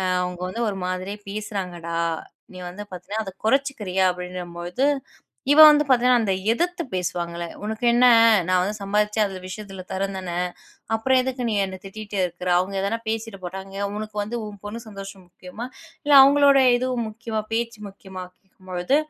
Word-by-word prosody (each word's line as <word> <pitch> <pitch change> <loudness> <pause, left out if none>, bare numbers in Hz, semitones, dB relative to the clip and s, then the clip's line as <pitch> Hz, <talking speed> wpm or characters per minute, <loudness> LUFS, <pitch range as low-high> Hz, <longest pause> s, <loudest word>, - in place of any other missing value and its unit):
அ - - -1 0.2
அவங்க 180 0 -4
வந்து 230 +6 -3
ஒரு 195 -2 -3
மாதிரியே 185 +3 -4
பேசுறாங்கடா. 185 -5 -4 0.6
நீ - - -9
வந்து 205 +4 -8
பாத்தீனா, 185 +5 -4
அத 190 - -6 0.2
குறைச்சுக்குறியா? 220 -8 +1
அப்படிங்கும் 180 -1 -7
பொழுது 180 +11 0 0.7
இவ 300 - +7
வந்து 295 0 +6
பாத்தீங்கன்னா, 250 -1 +4
அந்த 200 -3 +1 0.2
எதிர்த்து 350 +7 -1
பேசுவாங்கல்ல, 175 -1 -2 0.2
உனக்கென்ன? 235 +3 +3 0.4
நான் 185 0 +3
வந்து 205 +3 -2
சம்பாதிச்சேன். 210 +2 +1
அந்த 190 - -7
விஷயத்துல 195 0 -7
தர்றேன் 195 +1 -2
தானே? 175 -2 -5 0.6
அப்புறம் 255 +4 +3
எதுக்கு 255 0 -3
நீ 220 - 0
என்னை 190 -1 -5
திட்டிக்கிட்டு 205 0 -6
இருக்கிற? 180 +1 -6
அவங்க 185 +2 -2
எதனா 200 +4 -1
பேசிட்டு 225 -2 -3
போறாங்க. 190 +2 -7 0.2
உனக்கு 215 0 -6
வந்து 215 +4 -4
உன் 205 -1 -10
பொண்ணு 210 +3 -5
சந்தோஷம் 195 -2 -9
முக்கியமா? 185 +6 -8 0.4
இல்ல 290 - +2
அவங்களோட 280 0 +6 0.2
இது 250 +1 -1 0.2
முக்கியமா? 220 0 -4
பேச்சு 230 -1 -2
முக்கியமா? 190 -2 -9 0.4
பொழுது 180 +9 +1
205 Hz, 155 wpm, -23 LUFS, 185-230 Hz, 0.7 s, இவ